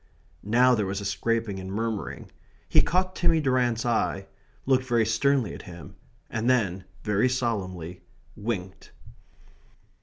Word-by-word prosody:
Now 125 +5 +4
there 105 -5 +1
was 95 +1 -2
a 100 - -6
scraping 105 +1 -1
and 95 0 -6
murmuring. 110 0 -3 0.4
He - - +5
caught 185 +1 0
Timmy 165 -2 +3
Durrant's 125 -5 +1
eye; 110 -4 0 0.4
looked 130 -1 +3
very 120 -3 +2
sternly 120 +1 +2
at - - -8
him; 85 -6 -11 0.3
and 115 +2 -1
then, 95 -7 +1 0.2
very 105 +3 +2
solemnly, 95 - -2 0.3
winked. 95 -4 -5
115 Hz, 130 wpm, -27 LUFS, 95-125 Hz, 0.4 s, He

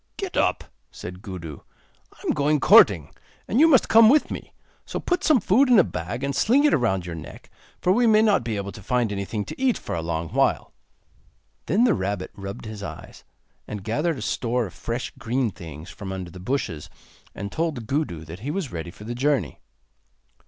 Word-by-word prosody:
'Get - - -5
up,' - - +1 0.3
said 90 +1 -9
Gudu; 90 - -7 0.5
'I - - -20
am - - +2
going 150 +1 +2
courting, 95 - +6 0.3
and 225 - +1
you 320 - +7
must 270 -7 +5
come 225 0 +7
with 295 +4 +3
me. - - -7 0.3
So - - -5
put 355 0 -1
some 305 -6 +5
food 240 +8 +3
in 245 - +7
a 190 - +7
bag, 100 - -5
and 140 -1 -1
sling 265 +6 +3
it 300 - +5
round 95 - 0
your 85 - -5
neck, 80 -2 -10 0.3
for 180 - +2
we 240 +3 +3
may 215 -1 +5
not 205 - +3
be 110 -2 -3
able 100 0 -4
to 105 - -11
find 120 +1 0
anything 100 +1 -3
to 255 - -8
eat 260 -3 +2
for - - -6
a 85 - -2
long 80 0 -3
while.' - - 0 0.9
Then 220 +5 +3
the 240 -4 +4
rabbit 95 0 -3
rubbed 100 +2 -8
his 110 -2 -7
eyes, - - -9 0.4
and 105 -2 -6
gathered 150 - -1
a 115 - -5
store 120 +1 -1
of 90 - -9
fresh 120 +2 -4
green 120 0 0
things 80 -1 -10
from 100 -2 -7
under 95 -2 -6
the 90 - -10
bushes, 90 - -3 0.5
and 100 0 -5
told 155 -8 -2
Gudu 115 - -2
that 80 +4 -9
he 125 +7 -5
was 160 -3 -3
ready 85 0 -5
for 105 - -12
the 115 +3 -5
journey. 135 +1 0
115 Hz, 205 wpm, -24 LUFS, -, 0.9 s, you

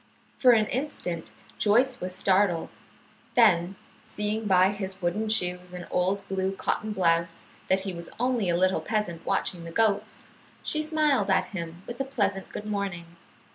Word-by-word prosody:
For 250 -2 +7
an 220 -2 +4
instant 210 - -3 0.3
Joyce 240 +5 +3
was 180 0 -3
startled; 185 -3 +2 0.6
then 190 -6 +4 0.3
seeing 215 0 -3
by 185 -1 +5
his 195 -2 -3
wooden 200 +5 -1
shoes 180 -4 0
and 180 -1 -6
old 195 +2 0
blue 190 0 -1
cotton 215 +2 -2
blouse 170 -3 +1 0.2
that 190 0 +2
he 190 -1 -4
was 170 -1 -6
only 245 -6 +1
a 170 - +2
little 185 +1 +2
peasant 210 -7 -2
watching 175 -2 -1
the 170 - -7
goats, 215 +1 0 0.4
she 305 - 0
smiled 310 -3 +2
at - - +2
him 170 0 -6
with 240 +2 -5
a - - +2
pleasant 205 -8 -1
good 210 - -7
morning. 190 -5 -4
195 Hz, 160 wpm, -27 LUFS, 180-220 Hz, 0.6 s, For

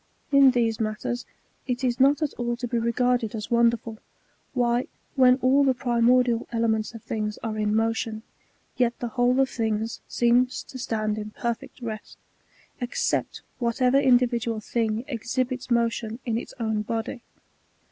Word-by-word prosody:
In 275 -1 +7
these 230 -3 +1
matters, 220 +2 -3 0.4
it 250 +1 -2
is 245 -1 0
not 280 +4 +4
at 295 - -1
all 240 -1 -2
to 245 - -4
be 235 0 0
regarded 235 0 +1
as 215 +1 -6
wonder 235 0 +4
ful, 225 -1 -9 0.6
why, 245 0 +1 0.3
when 255 -1 +6
all 270 +2 +5
the 265 -2 +3
primordial 240 -1 +2
elements 225 -1 0
of 225 - -10
things 215 -1 -3
are 225 -2 -2
in 210 0 0
motion, 225 0 -1 0.5
yet 245 -2 +1
the 240 - -4
whole 250 +1 +2
ef 270 -1 +3
things 225 -1 -2
seems 245 +1 +2
to 260 - -10
stand 215 -3 -1
in 210 0 -5
perfect 235 +4 -5
rest, 215 -2 -6 0.6
except 245 -1 -1 0.2
whatever 250 +2 +2
individual 240 -4 +2
thing 225 +1 -1
exhibits 255 +1 -2
motion 230 -1 0
in 230 -3 -1
its 230 - -5
own 220 -2 0
body. 225 +3 -4
235 Hz, 155 wpm, -25 LUFS, 225-250 Hz, 0.6 s, In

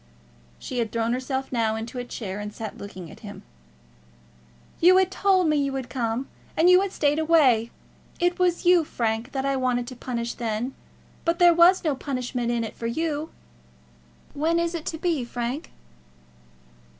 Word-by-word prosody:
She 250 - -5
had 225 -2 -1
thrown 230 0 0
herself 265 +1 -3
now 225 -3 +1
into 230 +3 -5
a - - -3
chair, 205 -5 -6
and 210 0 -5
sat 215 0 -7
looking 185 -5 -9
at - - -13
him. 205 -2 -10 1.4
"You 365 +2 +6
had 380 0 +3
told 380 -2 +3
me 305 -1 +2
that 285 - +2
you 275 -1 -2
would 260 -2 -5
come, 240 0 -2 0.3
and 330 - +5
you 365 +1 +7
had 395 -1 -2
stayed 295 -2 +1
away. 280 -9 +4 0.5
It 355 +1 +1
was 355 -1 +1
you, 350 -1 +6
Frank, 230 -2 -2
that 270 -1 -2
I 275 0 +1
wanted 250 -2 0
to 255 - -8
punish 235 -1 -4
then; 235 +2 -3 0.5
but 335 0 +1
there 350 -1 +6
was 345 +3 +5
no 310 -4 +1
punishment 250 -3 -3
in 235 -1 0
it 220 - -6
for 230 - -4
you. 310 +4 -2 1.0
When 320 +4 +1
is 340 0 -1
it 330 -2 -5
to 320 - -3
be, 325 -5 0
Frank?" 240 +4 -4
265 Hz, 180 wpm, -25 LUFS, 235-330 Hz, 1.4 s, you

